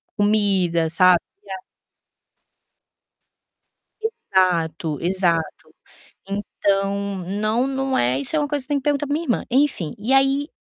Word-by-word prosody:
comida, 195 -6 +1
sabe, 180 0 +5 0.2
ga" 195 - -8 2.5
Exato, 180 - 0
exato. 170 -3 -1 0.5
Então, 200 0 -1 0.2
não, 225 +4 +1
não 270 -1 -1
é. 125 +2 +1
isso 315 - +3
é - - +3
uma 290 -1 -1
coisa 290 -2 -2
que - - -6
você - - -29
tem 290 -1 +1
que - - -8
perguntar 290 0 0
pra 285 - -3
minha 330 +3 -2
irmã. 240 - -1
Enfim, 260 - +1
e 225 +6 -2
aí 270 +2 +3
205 Hz, 135 wpm, -21 LUFS, 180-270 Hz, 2.5 s, sabe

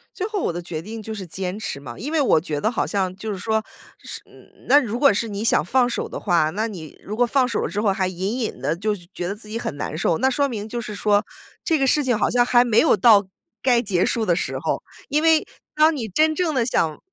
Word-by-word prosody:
最 375 - -3
后 420 -2 -3
我 170 - -1
的 175 - -4
决 170 -2 -6
定 220 +3 -8
就 220 - -6
是 195 -4 -7
坚 185 +4 -4
持 200 - -4
嘛。 120 -4 -9
因 290 - -5
为 320 -2 +2
我 250 - +4
觉 155 -3 -3
得 215 - +1
好 235 - -1
像 190 -3 -1
就 220 +1 -5
是 195 - -5
说， 220 +2 -1 0.4
是 - - -8
嗯， - - -20
那 285 +3 +8
如 230 -1 -3
果 280 -3 +5
是 230 +3 -1
你 205 0 -4
想 230 - +3
放 245 +8 +2
手 - - -3
的 - - -6
话， 170 -5 +2
那 215 +5 -1
你 165 -8 -9
如 210 - -5
果 245 - +4
放 255 +2 +2
手 230 - -2
了 - - -2
之 205 - -2
后， 210 - +2
还 190 -1 0
隐 190 +7 -3
隐 225 - -4
地 - - 0
就 210 +3 -1 0.2
觉 175 - -4
得 200 - -3
自 215 0 -12
己 225 +2 -4
很 145 - -4
难 145 +1 -4
受， 165 -1 +1
那 265 +2 +3
说 280 +2 +1
明 220 -5 -5
就 240 +2 -3
是 210 -2 -7
说， 205 0 +2 0.4
这 325 - +2
个 270 - +1
事 295 +3 +3
情 245 -5 +1
好 - - +1
像 245 0 +3
还 245 -1 +5
没 230 -2 +3
有 320 - +5
到 205 -1 +5 0.3
该 245 -2 +3
结 190 -6 0
束 230 -2 0
的 175 - +2
时 - - -2
候。 - - -2 0.3
因 295 +2 +2
为 320 -1 +4 0.3
当 310 +1 +5
你 230 -5 -4
真 310 - +2
正 320 -2 -1
地 235 -3 +2
想， 160 -10 0
220 Hz, 295 characters per minute, -22 LUFS, 190-250 Hz, 0.4 s, 那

